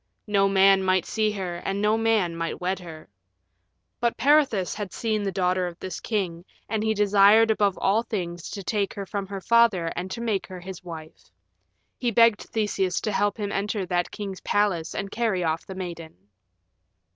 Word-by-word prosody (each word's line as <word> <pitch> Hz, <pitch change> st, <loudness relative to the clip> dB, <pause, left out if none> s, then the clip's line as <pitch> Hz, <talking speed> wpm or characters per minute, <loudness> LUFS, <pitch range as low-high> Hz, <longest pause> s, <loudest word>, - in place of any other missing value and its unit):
No 195 Hz, -2 st, +2 dB
man 195 Hz, 0 st, +5 dB
might 185 Hz, -2 st, +2 dB
see 215 Hz, -1 st, 0 dB
her, 185 Hz, -4 st, -4 dB
and 195 Hz, +3 st, -3 dB
no 210 Hz, +1 st, +2 dB
man 220 Hz, -6 st, +1 dB
might 165 Hz, 0 st, -3 dB
wed 185 Hz, +2 st, -1 dB
her. 160 Hz, -3 st, -11 dB, 0.9 s
But 235 Hz, 0 st, 0 dB
Peirithous 270 Hz, -8 st, +3 dB
had 205 Hz, -3 st, -5 dB
seen 220 Hz, -2 st, -1 dB
the 200 Hz, -1 st, -2 dB
daughter 185 Hz, -1 st, 0 dB
of 170 Hz, -1 st, -8 dB
this 185 Hz, -, -6 dB
king, 180 Hz, -6 st, -2 dB, 0.2 s
and 220 Hz, -1 st, -1 dB
he 220 Hz, 0 st, +1 dB
desired 210 Hz, +2 st, +5 dB
above 205 Hz, -3 st, +1 dB
all 205 Hz, +4 st, +2 dB
things 175 Hz, -7 st, -5 dB
to 200 Hz, -, -6 dB
take 200 Hz, 0 st, -1 dB
her 200 Hz, -, -5 dB
from 195 Hz, +1 st, -4 dB
her 195 Hz, 0 st, -6 dB
father 220 Hz, -7 st, +3 dB
and 185 Hz, +2 st, -4 dB
make 220 Hz, -4 st, -1 dB
her 185 Hz, -1 st, -8 dB
his 185 Hz, 0 st, -9 dB
wife. 160 Hz, -3 st, -10 dB, 0.7 s
He 245 Hz, -, +1 dB
begged 230 Hz, -1 st, +4 dB
Theseus 200 Hz, -4 st, -1 dB
to 215 Hz, -, -2 dB
help 205 Hz, +1 st, 0 dB
him 205 Hz, -2 st, -3 dB
enter 200 Hz, 0 st, -2 dB
that 175 Hz, 0 st, -1 dB
king's 195 Hz, -3 st, -6 dB
palace 195 Hz, -6 st, 0 dB
and 195 Hz, 0 st, -4 dB
carry 220 Hz, -6 st, 0 dB
off 160 Hz, 0 st, -2 dB
the 190 Hz, -, -7 dB
maiden. 170 Hz, -3 st, -7 dB
195 Hz, 180 wpm, -25 LUFS, 180-215 Hz, 0.9 s, man